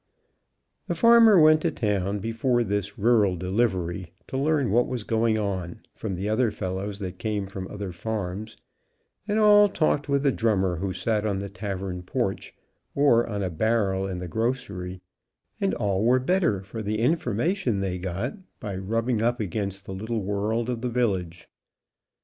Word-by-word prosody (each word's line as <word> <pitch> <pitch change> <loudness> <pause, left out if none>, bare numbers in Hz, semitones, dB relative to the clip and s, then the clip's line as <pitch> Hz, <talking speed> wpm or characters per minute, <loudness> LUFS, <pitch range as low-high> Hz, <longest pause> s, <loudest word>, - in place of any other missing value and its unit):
The - - -1
farmer 230 -4 +7
went 155 0 +6
to - - +1
town, 100 -3 -1
before 115 +3 0
this 100 -1 -2
rural 105 -3 +3
delivery, 90 -2 -1 0.2
to - - -5
learn 140 -4 +1
what 120 +3 +3
was 125 -4 -3
going 110 0 +1
on, 95 -5 -3
from 100 -4 -4
the 95 +3 -3
other 110 +2 +2
fellows 95 +1 -4
that 95 -2 -6
came 105 -3 -2
from 95 -1 -6
other 100 -2 -6
farms, 105 +2 -4 0.7
and 210 0 0
all 205 -1 +6
talked 155 -6 0
with 140 0 +2
the 140 - +4
drummer 95 -7 +1
who 95 +3 -2
sat 105 +2 -1
on 105 -3 0
the 100 +1 -4
tavern 95 -2 -5
porch, 90 - -3 0.4
or 140 -5 +4
on 100 -2 -2
a 90 - -2
barrel 95 0 +1
in 95 -2 -4
the 90 0 -5
grocery, 100 -4 -3 0.6
and - - 0
all 100 0 0
were 125 +3 +4
better 130 - +1
for 110 +3 -7
the 105 +1 -2
information 160 - 0
they 95 -2 -2
got 95 - -3 0.3
by 100 -2 -5
rubbing 115 +4 -1
up 120 +2 +1
against 100 -1 -3
the 95 - -6
little 110 +2 -3
world 105 +4 -1
of 120 -2 -3
the 125 - -1
village. 95 -8 -1
105 Hz, 165 wpm, -26 LUFS, 95-120 Hz, 0.7 s, farmer